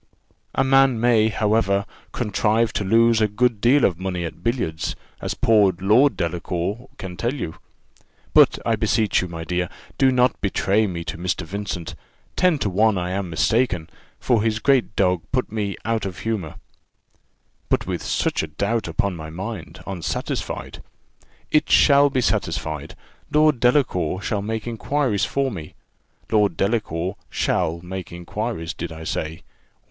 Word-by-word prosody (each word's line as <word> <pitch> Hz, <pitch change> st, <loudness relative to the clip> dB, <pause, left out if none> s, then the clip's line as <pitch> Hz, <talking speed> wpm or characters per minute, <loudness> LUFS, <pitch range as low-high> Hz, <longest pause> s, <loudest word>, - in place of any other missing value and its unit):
"A 135 Hz, -, +3 dB
man 135 Hz, -2 st, +4 dB
may, 115 Hz, -2 st, +4 dB
however, 105 Hz, -1 st, +1 dB, 0.3 s
contrive 110 Hz, 0 st, +1 dB
to -, -, -1 dB
lose 115 Hz, +3 st, +4 dB
a 110 Hz, -, +4 dB
good 110 Hz, +1 st, +1 dB
deal 130 Hz, +3 st, +5 dB
of 90 Hz, -3 st, 0 dB
money 90 Hz, -2 st, -3 dB
at 85 Hz, +1 st, -8 dB
billiards, 115 Hz, -10 st, -1 dB, 0.3 s
as -, -, -3 dB
poor 105 Hz, -5 st, +4 dB
Lord 110 Hz, +9 st, +4 dB
Delacour 90 Hz, +7 st, -3 dB
can 95 Hz, -2 st, -7 dB
tell 120 Hz, +10 st, -1 dB
you. 85 Hz, -, -5 dB, 0.8 s
But -, -, +6 dB
I -, -, +2 dB
beseech 110 Hz, -3 st, +1 dB
you, 90 Hz, -, -3 dB
my 85 Hz, -1 st, -6 dB
dear, 90 Hz, +1 st, -1 dB, 0.3 s
do 135 Hz, -1 st, +5 dB
not 125 Hz, 0 st, +2 dB
betray 100 Hz, +2 st, +1 dB
me 85 Hz, -3 st, -4 dB
to 85 Hz, -, -6 dB
Mr. 90 Hz, -1 st, -2 dB
Vincent; 95 Hz, -1 st, -5 dB, 0.4 s
ten 180 Hz, -4 st, +3 dB
to 120 Hz, -, -1 dB
one 105 Hz, +2 st, +3 dB
I 90 Hz, 0 st, -2 dB
am 95 Hz, -1 st, -2 dB
mistaken, 90 Hz, -1 st, +1 dB, 0.3 s
for 120 Hz, -4 st, +2 dB
his 110 Hz, 0 st, +1 dB
great 130 Hz, -3 st, +2 dB
dog 90 Hz, -3 st, +2 dB
put 130 Hz, -4 st, -1 dB
me 105 Hz, -3 st, -2 dB
out 115 Hz, -3 st, 0 dB
of 95 Hz, -1 st, -7 dB
humour 95 Hz, -8 st, -3 dB, 0.6 s
" -, -, -43 dB
"But -, -, +1 dB
with -, -, -3 dB
such -, -, 0 dB
a 80 Hz, -, -4 dB
doubt 100 Hz, +8 st, -1 dB
upon 90 Hz, +3 st, -1 dB
my 80 Hz, -1 st, -7 dB
mind, 90 Hz, -1 st, -7 dB
unsatisfied 95 Hz, -4 st, -4 dB, 0.4 s
" -, -, -44 dB, 0.3 s
"It 155 Hz, 0 st, +3 dB
shall 140 Hz, -1 st, +6 dB
be 130 Hz, -2 st, 0 dB
satisfied; 80 Hz, -8 st, -2 dB, 0.4 s
Lord 150 Hz, -3 st, +4 dB
Delacour 115 Hz, -, +2 dB
shall 105 Hz, -2 st, -1 dB
make 110 Hz, +1 st, -3 dB
inquiries 120 Hz, -2 st, 0 dB
for 135 Hz, +2 st, -1 dB
me. 80 Hz, -7 st, -8 dB, 0.6 s
Lord 105 Hz, -2 st, +2 dB
Delacour 95 Hz, -4 st, -1 dB
shall 85 Hz, +1 st, 0 dB
make 95 Hz, 0 st, -6 dB
inquiries, 85 Hz, -1 st, -4 dB
did 85 Hz, 0 st, -6 dB
I 80 Hz, 0 st, -8 dB
say? 80 Hz, 0 st, -4 dB
100 Hz, 160 wpm, -22 LUFS, 90-115 Hz, 0.8 s, But